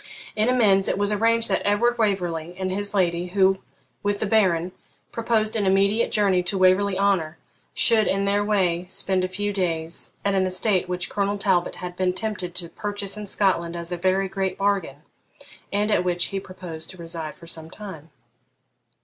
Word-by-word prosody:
In 215 +2 +2
amends 205 -6 +4
it - - 0
was 205 +1 +3
arranged 230 +2 +3
that - - +1
Edward 235 +4 +2
Waverley 175 -5 -1
and 185 0 -2
his 205 +1 -3
lady, 175 -2 +1
who, 190 +1 +2 0.4
with 205 0 -1
the - - -1
Baron, 185 -5 +2 0.4
proposed 225 -2 0
an 205 -3 0
immediate 200 +4 +2
journey 195 -4 +3
to 180 +2 -2
Waverley 185 +1 +3
Honour, 190 -6 +1 0.4
should 225 -3 +4
in 195 +1 +1
their 200 +1 +2
way 185 -4 +1
spend 190 -1 0
a - - +1
few 205 +2 -2
days 170 -3 -2
at 200 - +2
an 190 -1 +2
estate 185 0 +1
which 180 0 -2
Colonel 200 0 -1
Talbot 190 -3 +1
had 180 -1 -7
been 185 0 0
tempted 185 -4 -4
to 175 -2 -2
purchase 205 +1 -4
in 210 -1 -6
Scotland 175 -4 +1
as 170 0 -5
a - - 0
very 190 +2 +1
great 190 0 -2
bargain, 195 -8 -1 0.7
and 210 +2 0
at 180 - +3
which 175 -1 +1
he 195 - 0
proposed 180 -4 -8
to 185 - -6
reside 165 -2 -6
for 170 - -15
some 160 -1 -3
time. 165 -6 -10
190 Hz, 185 wpm, -24 LUFS, 180-205 Hz, 0.7 s, amends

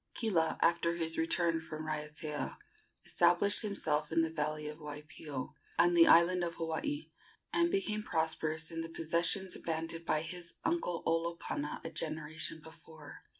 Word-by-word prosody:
Kila, 180 -9 +1
after 170 0 +3
his 165 -1 -1
return 165 0 +1
from 155 -1 -6
Raiatea, 150 -1 -3 0.5
established 175 +4 +4
himself 155 -8 -1
in 165 0 +4
the 160 - -1
valley 150 -1 -2
of 150 +1 -7
Waipio, 150 -2 -6 0.2
on 175 +1 +5
the 170 -1 +7
island 175 +2 +6
of 170 -1 -2
Hawaii, 165 - -3 0.4
and 340 0 +3
became 220 - 0
prosperous 160 -2 -1
in 165 0 -3
the 165 - -5
possessions 170 +3 0
abandoned 165 0 -4
by 155 -1 +1
his 170 +1 -6
uncle 330 - 0
Olopana 165 -3 -1
a 165 - -4
generation 160 0 -2
before. 160 -1 -12
165 Hz, 145 wpm, -34 LUFS, 155-170 Hz, 0.5 s, the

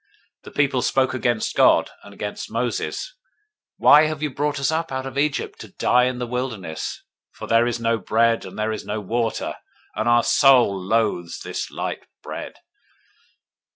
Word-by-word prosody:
021:005 - - -67
The - - -10
people 140 -3 +2
spoke 130 0 +1
against 120 -2 -1
God, - - +4
and 100 - -14
against 105 +1 -6
Moses, 120 - -3 0.6
Why 150 +1 +7
have 155 -1 -4
you 150 - -1
brought 145 +1 -1
us 140 +2 +1
up 165 0 -2
out 130 0 -3
of 135 -1 -7
Egypt 145 +1 -1
to - - -11
die 125 0 +3
in 125 0 -1
the 125 - -3
wilderness? 115 -9 -4 0.3
for - - -8
there 115 +1 +3
is 120 0 -2
no 115 0 +1
bread, 115 +4 +2
and 95 - -10
there 110 +1 -1
is 110 - -4
no 105 +1 -3
water; 115 +3 -2 0.4
and 120 - 0
our 120 0 +5
soul 130 -8 +5
loathes 95 -3 -1
this - - -4
light - - -5 0.2
bread. - - -6
120 Hz, 175 wpm, -22 LUFS, 110-135 Hz, 0.6 s, Why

